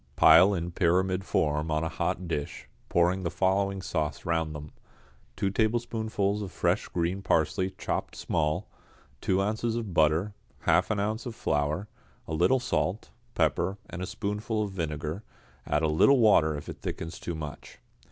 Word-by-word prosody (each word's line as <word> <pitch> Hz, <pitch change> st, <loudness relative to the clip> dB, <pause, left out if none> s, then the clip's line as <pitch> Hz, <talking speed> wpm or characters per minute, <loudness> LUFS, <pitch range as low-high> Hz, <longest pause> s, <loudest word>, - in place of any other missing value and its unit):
Pile 90 Hz, +8 st, +7 dB
in 85 Hz, 0 st, -3 dB
pyramid 90 Hz, +2 st, +1 dB
form 75 Hz, -3 st, 0 dB
on 75 Hz, +1 st, 0 dB
a -, -, 0 dB
hot 90 Hz, +2 st, -2 dB
dish, 75 Hz, -3 st, -4 dB, 0.2 s
pouring 90 Hz, +2 st, +2 dB
the 85 Hz, -, -1 dB
following 95 Hz, +1 st, 0 dB
sauce 75 Hz, -5 st, -2 dB
round 80 Hz, -2 st, 0 dB
them: 75 Hz, 0 st, -8 dB, 0.6 s
two 95 Hz, -, 0 dB
tablespoonsful 110 Hz, -2 st, 0 dB
of 95 Hz, -, -6 dB
fresh 90 Hz, +4 st, 0 dB
green 90 Hz, +3 st, -1 dB
parsley 85 Hz, +2 st, +1 dB
chopped -, -, -3 dB
small, 75 Hz, -1 st, -1 dB, 0.5 s
two 95 Hz, -, +1 dB
ounces 110 Hz, +3 st, -1 dB
of 110 Hz, -6 st, -4 dB
butter, 80 Hz, +6 st, +2 dB, 0.3 s
half -, -, +3 dB
an 105 Hz, -, 0 dB
ounce 110 Hz, +4 st, -2 dB
of 115 Hz, -, -6 dB
flour, 75 Hz, -2 st, -1 dB, 0.4 s
a 80 Hz, -, -4 dB
little 90 Hz, +11 st, +3 dB
salt, 110 Hz, -4 st, -1 dB, 0.2 s
pepper, 85 Hz, +5 st, +1 dB
and 90 Hz, -, -5 dB
a 90 Hz, -, -3 dB
spoonful 105 Hz, +1 st, -2 dB
of 100 Hz, -, -4 dB
vinegar; 80 Hz, 0 st, -3 dB, 0.5 s
add 75 Hz, +2 st, +1 dB
a -, -, +4 dB
little 80 Hz, -, +5 dB
water 80 Hz, -10 st, +4 dB
if 75 Hz, -, -8 dB
it -, -, -7 dB
thickens 80 Hz, +1 st, -5 dB
too 85 Hz, -, -4 dB
much. 75 Hz, -2 st, -8 dB
90 Hz, 160 wpm, -28 LUFS, 80-100 Hz, 0.6 s, Pile